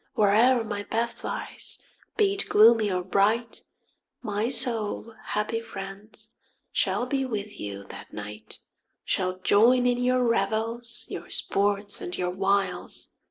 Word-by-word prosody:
Where'er 225 +4 +4
my 205 -2 -4
path 230 +3 -3
lies, - - +1 0.4
be 400 -2 +3
it 400 - -1
gloomy 220 -1 +6
or 180 -1 -1
bright, 210 +6 +1 0.6
My 210 +2 -1
soul, 230 -3 0
happy 210 +2 -1
friends, 200 -1 -8 0.4
shall 245 - 0
be 270 +1 -1
with 210 -5 -5
you 100 -1 -6
that 100 - -11
night; 105 +1 -8 0.5
Shall 185 0 -1
join 235 +7 +4
in 245 0 +2
your 250 0 +2
revels, 230 +1 -1
your - - -7
sports 200 0 0
and 175 - -2
your 180 0 -1
wiles. 195 +1 -1
215 Hz, 130 wpm, -26 LUFS, 195-235 Hz, 0.6 s, gloomy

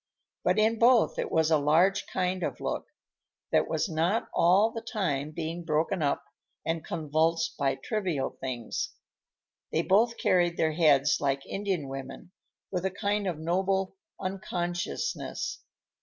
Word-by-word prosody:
But - - +2
in 220 +1 +3
both 235 0 +4
it - - -2
was 160 0 +2
a 155 - +5
large 175 +8 +3
kind 185 0 -1
of - - -3
look, - - -3 0.6
that - - +3
was - - 0
not 170 +6 0
all 190 +6 +4
the 225 - -5
time 165 - -2
being 165 +2 -4
broken 160 +3 0
up 140 -1 0 0.4
and 165 -1 -1
convulsed 160 +1 0
by 135 -2 +1
trivial 185 - -2
things. 125 -4 -4 0.8
They 165 - +1
both 225 +6 +3
carried 175 -4 +2
their 160 - +2
heads 150 -3 +4
like 140 -1 0
Indian 195 -7 -2
women, 135 +5 -8 0.4
with 180 -2 -2
a 190 - +1
kind 205 +1 -1
of 175 -4 -2
noble 190 - 0 0.2
unconsciousness. 180 - -3
175 Hz, 140 wpm, -28 LUFS, 155-195 Hz, 0.8 s, a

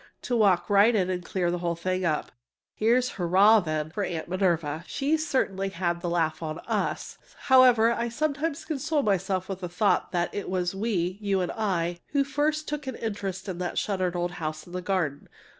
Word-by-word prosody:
to 245 - -1
walk 190 -6 +3
right 205 +3 +5
in 185 -3 +1
and 180 -1 -3
clear 175 -1 -1
the 175 - -2
whole 170 -1 -1
thing 185 +2 -2
up! 155 -3 -1 0.4
Here's 245 +3 +2
"Hurrah!" 195 +5 +5
then, 155 -3 -3
for 205 +4 -2
Aunt 165 -4 -3
Minerva! 170 -4 0
She 285 +3 0
certainly 215 -11 -1
had 175 -2 -2
the 175 - -2
laugh 165 -2 0
on 155 -1 -4
us! - - -2 0.2
However, 250 -4 +6
I 235 0 -1
sometimes 300 +4 -2
console 305 -1 -1
myself 190 -2 0
with 195 -2 -5
the 180 -2 -5
thought 200 +4 +1
that 175 -1 -1
it 205 - -4
was 180 -1 -1
we 195 -3 -1
(you 200 -2 +1
and 180 - -1
I) 175 -5 -1
who 280 -1 +3
first 295 +3 -1
took 295 -2 -4
an 260 - -3
interest 200 -4 -4
in 180 -2 -4
that 180 -1 -3
shuttered 185 -3 -1
old 175 0 -1
house 155 -2 -5
in 175 - -13
the 180 - -3
garden. 175 -7 -2
190 Hz, 195 wpm, -27 LUFS, 175-230 Hz, 0.4 s, However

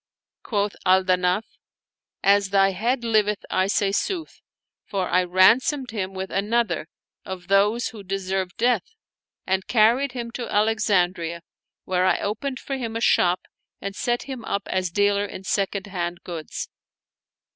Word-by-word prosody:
Quoth 205 -2 -1
Al 185 +1 +4
Danaf, 185 +2 +2 0.5
" - - -63
As 200 -1 -1
thy 195 0 +4
head 240 +6 -1
liveth 210 -3 +1
I 185 0 +2
say 200 0 +1
sooth; 330 - -3 0.4
for 190 -3 -2
I 185 - +3
ransomed 225 - +3
him 195 -3 -4
with 190 0 -5
another, 200 -5 0 0.4
of 185 -1 -8
those 205 +4 +3
who 220 - -10
deserved 190 -1 -3
death; 240 - +1 0.5
and 190 0 -1
carried 245 +4 +3
him 235 -2 -5
to 240 0 -5
Alexandria 185 -6 +1 0.4
where 185 0 +1
I - - +3
opened 255 +6 -3
for 275 - -4
him 230 -3 -4
a - - -1
shop 180 -5 +3 0.4
and 200 0 -5
set 240 +2 -1
him 260 -4 -7
up 200 - -2
as 185 -1 -1
dealer 205 +2 +2
in 195 - -8
second 195 0 -1
hand 175 -2 -4
goods." 165 -3 -6
200 Hz, 150 wpm, -24 LUFS, 185-230 Hz, 0.5 s, Al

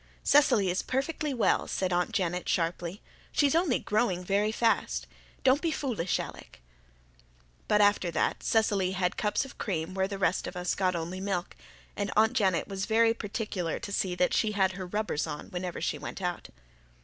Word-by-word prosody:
"Cecily 240 -10 +4
is 180 - 0
perfectly 285 +3 -2
well," 245 -4 +2
said 185 -1 -1
Aunt 175 0 +1
Janet 180 -1 -1
sharply. 170 +2 -1 0.3
"She's 285 -2 +3
only 330 -6 +3
growing 205 -5 0
very 205 +3 +1
fast. 225 0 +1 0.4
Don't 265 +3 +4
be 335 - +1
foolish, 235 - -1
Alec." - - -8 1.1
But 210 - +4
after 205 -3 +3
that - - 0
Cecily 200 -4 +2
had 180 -1 0
cups 210 +5 0
of 270 - -13
cream 175 -3 -2
where 190 0 0
the 200 0 -5
rest 190 -1 +1
of - - -7
us 180 0 0
got 185 -2 +1
only 170 +3 -4
milk; 190 -2 -3 0.4
and 205 -1 -2
Aunt 220 +2 +5
Janet 190 -8 +1
was 195 0 -4
very 225 0 +4
particular 205 -6 -3
to 200 - -7
see 190 -2 0
that 180 0 +2
she 215 -1 +2
had 190 -2 +2
her 185 0 -6
rubbers 205 -6 -1
on 150 -1 -7
whenever 180 -1 -4
she - - -2
went - - -6
out. 180 -2 -3
195 Hz, 180 wpm, -29 LUFS, 180-220 Hz, 1.1 s, Aunt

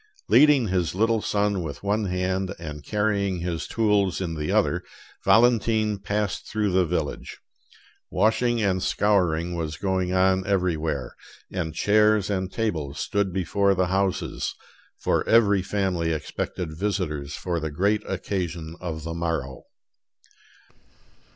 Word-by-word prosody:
Leading 140 -5 +5
his 90 -3 0
little 110 +2 +2
son 100 -2 0
with 80 0 -6
one 105 +1 0
hand, 95 0 -1
and 75 -3 -7
carrying 100 -2 0
his 85 -1 -3
tools 105 -5 +1
in 90 -3 -3
the 75 -1 -3
other, - - +2 0.4
Valentine 110 -3 +3
passed 100 -1 -2
through 105 -2 0
the 90 -1 +3
village. 80 -4 -3 0.7
Washing 120 +2 +2
and 95 -2 +1
scouring 90 -5 +1
was 80 -2 -3
going 95 -1 -1
on 95 0 +3
everywhere, 80 -9 -1 0.4
and 85 -4 -3
chairs 105 +1 +3
and 95 -1 -2
tables 80 -11 -2
stood 100 -2 0
before 95 +2 +1
the 95 0 +2
houses, 95 -1 -1 0.4
for - - +1
every 105 -4 +5
family 95 -4 -1
expected 80 +1 -4
visitors 80 -7 -2
for 85 -2 -2
the 80 0 -3
great 100 +8 +1
occasion 85 -4 -3
of 80 -4 -5
the 80 +1 -4
morrow. 80 -6 -3
95 Hz, 130 wpm, -25 LUFS, 85-105 Hz, 0.7 s, Leading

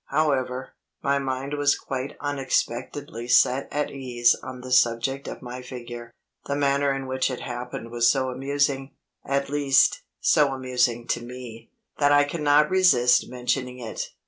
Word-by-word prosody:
However, 130 -4 0 0.3
my 140 0 +2
mind 135 +1 -3
was 145 -1 +2
quite 135 +1 -5
unexpectedly 135 -3 -2
set 125 +2 +4
at 150 0 -1
ease 120 -3 +2
on 130 -1 -8
the 130 0 -8
subject 125 +2 +2
of - - -7
my 125 +1 -7
figure. 120 -2 -8 0.4
The 140 - -1
manner 140 0 +2
in 135 0 -3
which 130 +1 0
it 130 - -5
happened 120 -1 -6
was 120 -1 +3
so 130 -2 +1
amusing 135 +1 -1 0.3
at 140 0 -1
least, 140 -1 +3 0.2
so 145 -2 +3
amusing 125 -2 0
to 120 - -1
me 120 -2 -10 0.3
that 145 -1 +4
I 145 0 +6
cannot 150 0 +2
resist 155 -10 +4
mentioning 125 0 -2
it. 115 -3 -5
130 Hz, 150 wpm, -25 LUFS, 125-140 Hz, 0.4 s, I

